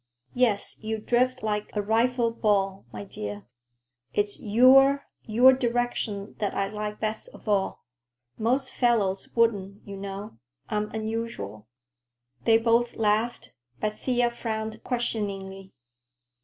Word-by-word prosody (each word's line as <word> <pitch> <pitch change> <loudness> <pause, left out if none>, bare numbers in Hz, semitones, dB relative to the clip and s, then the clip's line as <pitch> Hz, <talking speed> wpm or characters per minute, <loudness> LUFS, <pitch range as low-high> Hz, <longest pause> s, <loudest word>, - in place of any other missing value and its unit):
"Yes, 235 -5 +1
you 220 0 -2
drift 245 +3 +1
like 210 -1 -1
a 210 - +1
rifle 230 +2 +2
ball, 195 - 0
my 105 -1 -6
dear. 105 0 -7 0.7
It's 205 0 0
your—your 260 +1 +5
direction 240 -4 -1
that 205 - -1
I 195 0 0
like 210 0 -5
best 220 - -3
of - - -16
all. 200 -7 0 0.5
Most 255 +4 0
fellows 210 -6 +1
wouldn't, 205 -4 +1
you 200 - -6
know. 195 - -7 0.3
I'm 210 -1 -1
unusual." 220 - -4 0.8
They 225 - +6
both 235 +1 +2
laughed, 220 +2 0 0.3
but 215 0 -2
Thea 245 -2 +1
frowned 220 -2 -4
questioningly. 195 -6 -3
220 Hz, 115 wpm, -27 LUFS, 200-240 Hz, 0.8 s, They